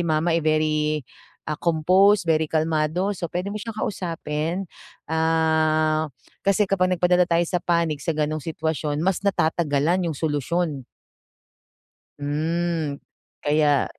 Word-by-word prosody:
mama, 165 0 +1
eh, 165 - +2
very, 155 -1 +1 0.4
ah, 150 0 -4
composed, 185 +4 +4
very 160 -2 +1
kalmado, 160 +4 0
so 175 -3 -5
puwede 180 +5 -3
mo 210 - -4
siyang 225 -1 -6
kausapin. 170 -3 -3 0.4
Ah, 160 -1 +2 0.3
kasi 200 +1 +2
kapag 190 -2 +1
nagpadala 180 0 +3
tayo 170 0 +3
sa 175 +1 -1
panic 170 -4 0
sa 165 -2 -2
gano'ng 155 0 -1
sitwasyon, 155 -1 -2
mas 190 -1 +1
natatagalan 170 -2 +1
yung 155 - -4
solusyon. 145 -1 -1 1.3
Hmm, 155 0 -1 0.5
kaya 145 -1 +3
160 Hz, 120 wpm, -23 LUFS, 155-175 Hz, 1.3 s, composed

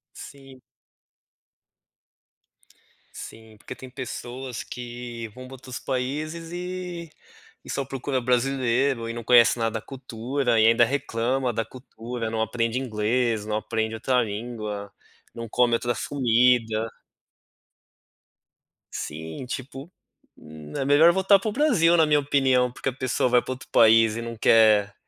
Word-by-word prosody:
Sim. 135 -2 -12 2.6
Sim, 110 -1 -11
porque 125 - -9
tem 130 -1 -12
pessoas 125 -1 -6
que 120 -1 -7
vão 130 0 -9
para 135 - -12
outros 130 -1 -8
países 150 +6 -4
e 180 -2 -6 0.5
e - - -12
só 140 - -2
procura 135 0 -3
brasileiro, 125 0 +1
e 115 - -4
não 120 0 -6
conhece 120 0 +5
nada 115 -1 -1
da - - -14
cultura, 125 -1 -2
e 110 - +6
ainda 115 +1 +5
reclama 125 0 -1
da 115 +1 -1
cultura, 120 -1 -7
não 110 0 -2
aprende 115 +1 -1
inglês, 115 -2 0
não 105 0 -2
aprende 110 +1 -2
outra 125 +2 +1
língua, 105 -2 -5 0.4
não 115 -1 -7
come 120 +1 +2
outras 120 0 -2
comida. 115 -4 +2 2.0
Sim, 80 +9 -6
tipo, 135 +5 -7 0.5
hum, 75 -1 -12
é 135 - -1
melhor 150 +4 +6
voltar 190 +2 +4
pro 215 +2 -3
Brasil 205 - +3
na 160 - +5
minha 150 -1 +3
opinião, 130 -3 +2
porque 135 - -3
a 130 - -6
pessoa 130 -1 0
vai 125 0 +4
pra - - -6
outro 130 - -12
país 115 -1 +5
e 115 - -4
não 115 -1 -6
quer 105 -3 +4
125 Hz, 140 wpm, -25 LUFS, 115-135 Hz, 2.6 s, e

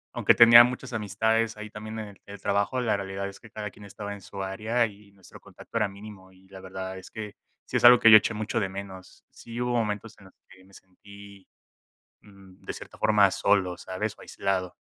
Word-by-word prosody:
aunque - - +4
tenía 115 0 +9
muchas 125 +1 -4
amistades 110 +2 0
ahí 105 0 -8
también 110 +1 -8
en 105 -2 -9
el 100 0 -10
trabajo, 100 +6 -1
la 115 -4 +1
realidad 100 0 -5
es 100 - -11
que 115 - -16
cada 105 -2 -7
quien 105 - -16
estaba 100 0 -7
en 100 - -11
su 100 +1 -7
área 110 +5 0
y 100 -1 -12
nuestro 95 -2 -16
contacto - - -16
era 105 -2 +1
mínimo, 100 -1 -13
y 95 0 -23
la 95 -1 -11
verdad 95 0 -7
es 95 - -13
que 110 -2 -8 0.3
sí - - -2
es - - -3
algo 125 0 +9
que 115 - +7
yo 110 - +12
eché 110 +2 -1
mucho 110 +1 -2
de 95 -2 -2
menos. 95 -1 -10
Sí 115 +1 -10
hubo 125 0 -1
momentos 110 0 -3
en 100 - -17
los 95 - -18
que 95 0 -18
me 95 +1 -22
sentí, 100 +1 -16 0.7
mm, 95 -2 -19
de - - -5
cierta - - -12
forma 105 -2 +4
solo, 95 -3 +1
¿sabes?, 105 +4 -5
o - - -16
aislado. 95 -2 -3
100 Hz, 220 wpm, -26 LUFS, 95-110 Hz, 0.7 s, yo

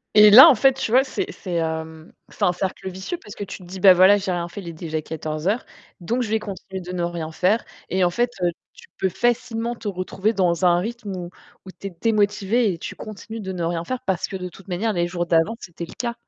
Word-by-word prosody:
Et 210 0 +9
là 255 +9 +11
en 320 - +8
fait, 270 +3 +4
tu 255 -4 -3
vois, 255 +3 +6
c'est 380 +9 -4
c'est, 185 - -7
hem, 160 -1 -4 0.2
c'est - - -6
un 180 - +4
cercle 190 +1 -4
vicieux 190 - -5
parce 210 -11 -12
que - - -6
tu 195 - -8
te - - -13
dis: 185 +2 -9
«Bah, 190 0 +8
voilà, 190 +3 +7
j'ai 195 -2 -3
rien 175 -1 -2
fait, 190 +4 -8
il 180 - -11
est 170 - -4
déjà 160 -1 -4
14:00, 160 - -3 0.4
donc 235 +9 -1
je 225 - -3
vais 220 - +2
continuer 195 -2 -7
de 180 0 -8
ne 180 -1 -3
rien 170 -2 -4
faire», 185 +7 +1 0.2
et 185 0 +1
en 175 - +3
fait, 240 +6 +1
heu, 175 - +3 0.2
tu 470 - -16
peux 190 - +1
facilement 235 +2 -1
te 230 - -8
retrouver 190 +2 -1
dans 180 -3 +1
un 175 -1 +5
rythme 220 +1 -5
où 175 -1 -6 0.4
où 190 - -9
tu 200 - -5
es - - -5
démotivée 210 0 +2
et - - -7
tu - - -7
continues 220 +1 -8
de 190 -3 -5
ne 175 -2 -3
rien 165 0 -1
faire 255 +4 -3
parce 190 -3 -1
que - - -7
de 180 -1 -5
toute 190 +2 -16
manière, 200 +5 -1
les 175 -2 0
jours 175 0 -2
d'avant, 170 +6 +2
c'était 170 -4 -8
le - - -12
cas. 235 -1 -2
190 Hz, 260 wpm, -22 LUFS, 175-220 Hz, 0.4 s, là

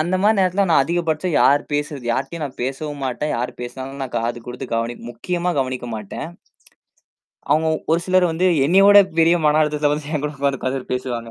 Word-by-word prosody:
அந்த 175 +4 0
மாரி 215 +2 +3
நேரத்துல 190 +1 +2
நான் 160 -5 +5
அதிகபட்சம் 165 +1 -1
யார் 145 +1 +4
பேசுறது, 145 -2 -3
யார்ட்டயும் 165 +6 -3
நான் 135 -3 -7
பேசவும் 140 +2 -4
மாட்டேன். 130 +4 -2
யாரு 120 +2 -3
பேசனாலும் 130 +3 -7
நான் 130 - -6
காது 120 +1 -2
குடுத்து 125 +2 -6
கவனி 115 +1 -1 0.2
முக்கியமா 175 +9 -2
கவனிக்க 130 -2 -4
மாட்டேன். 105 +7 -6 1.2
அவங்க 160 +1 +3 0.2
ஒரு 170 - +2
சிலர் 185 -1 +3
வந்து 175 +3 +1 0.2
என்னைய 190 +5 +5
விடப் 200 -4 +6
பெரிய 165 +2 +5
மன 150 +1 +4
அழுத்தத்துல 150 -1 +1
வந்து 150 +1 -6
என்கிட்ட 145 -1 -2
வந்து 140 -1 -1
உட்கார்ந்து 130 0 -4
பேசுவாங்க. 120 -2 -4
145 Hz, 180 wpm, -20 LUFS, 130-170 Hz, 1.2 s, விடப்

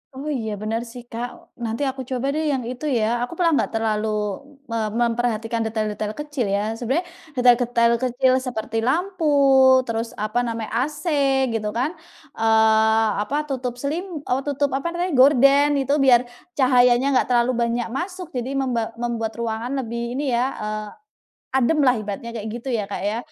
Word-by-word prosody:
Oh 280 +3 -5
iya 230 -7 -2
bener 220 +2 -2
sih 245 0 -9
Kak, 235 +1 -3 0.4
nanti 225 +3 -3
aku 265 0 -5
coba 260 0 -2
deh 315 - 0
yang 265 - -1
itu 255 +4 -7
ya. 220 - +1 0.2
Aku 245 - -10
malah 340 -1 +2
nggak - - 0
terlalu 220 -1 0 0.6
me 230 - -2 0.3
memperhatikan 230 -1 -1
detail-detail 215 -1 -2
kecil 295 -5 -2
ya, 200 - 0 0.2
sebenarnya 265 +10 -1 0.3
detail-detail 245 -2 +4
kecil 255 +1 +2
seperti 245 -3 -4
lampu 350 +5 0 0.6
terus 230 0 -3
apa 215 +3 -2
namanya, 230 -2 -4 0.2
AC 300 0 -8 0.5
gitu 215 -2 -2
kan, 245 +5 0 0.5
eee, 220 0 +4 0.2
apa 275 - -3
tutup 255 -2 -2
selim 325 +3 -3
eee, 255 +2 +1
tutup 285 0 0
apa 275 - -3
namanya 350 0 -2
gorden 275 +2 +6
itu 275 +2 0
biar 245 -2 +6 0.3
cahayanya 250 -1 +4
nggak - - +1
terlalu 240 +1 +3
banyak 235 0 0
masuk 365 -1 -5
jadi 250 +2 -3
memba 250 -5 -1
membuat 230 -2 -2
ruangan 235 +3 -3
lebih 235 +1 -4
ini 280 +1 -2
ya, 240 +1 +2 0.2
eee, 215 0 -4 0.7
ademlah 265 -2 +3
ibaratnya 210 +2 -5
kayak 225 -2 -6
gitu 245 +2 -5
ya 215 -4 -1
Kak 200 - -5
ya. 210 +3 -1
245 Hz, 160 wpm, -22 LUFS, 225-270 Hz, 0.7 s, gorden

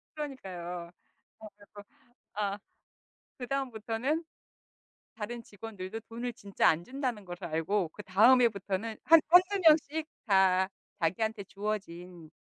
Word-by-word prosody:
그러니까요. 180 - -6 0.5
어 220 - -9
그리고 205 0 -14 0.5
아 200 -1 -1 0.8
그다음부터는 255 +2 -2 0.9
다른 235 +2 -5
직원들도 210 -1 -8
돈을 240 +2 -5
진짜 200 -1 +1
안 165 +2 +1
준다는 255 -4 -3
걸 175 -1 -7
알고 165 +3 -1
그다음 210 +7 +4
해부터는 200 -1 0
한 330 0 +8
1-2 365 +3 +6
명씩 315 -1 +4 0.2
다 190 -2 +4 0.3
자기한테 200 +5 -1
주어진 180 -5 -6
210 Hz, 245 characters per minute, -30 LUFS, 185-250 Hz, 0.9 s, 한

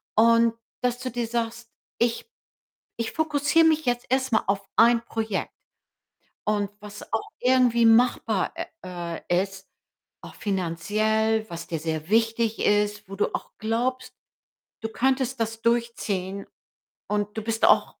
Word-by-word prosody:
Und 230 +1 +5 0.3
dass 245 0 0
du 255 - -4
dir 240 0 -2
sagst: 230 0 -3 0.3
„Ich 235 - 0 0.7
ich 230 - -2
fokussiere 310 +1 +2
mich 315 -2 +3
jetzt 245 0 0
erst 260 0 +1
mal 220 - +3
auf 195 0 -1
1 235 0 +5
Projekt.“ 220 -3 -3 0.9
Und 205 -2 0
was 210 0 -10
auch 225 - -1
irgendwie 250 -2 +4
machbar, 240 +2 +3
ä - - -4 0.6
äh, 175 +1 +3
ist, 195 0 -10 0.6
auch - - -10
finanziell, 215 +4 0
was 170 0 -6
dir 165 -2 -3
sehr 160 0 -3
wichtig 225 0 +2
ist, 210 -1 +1
wo 195 - -6
du 205 - 0
auch - - -6
glaubst, 245 +4 -1 0.7
du 225 - -3
könntest 260 +1 0
das 225 0 -2
durchziehen 210 -5 -1 0.6
und 210 +1 -1
du - - -1
bist 225 0 +1
auch - - +5
225 Hz, 140 wpm, -25 LUFS, 205-240 Hz, 0.9 s, Und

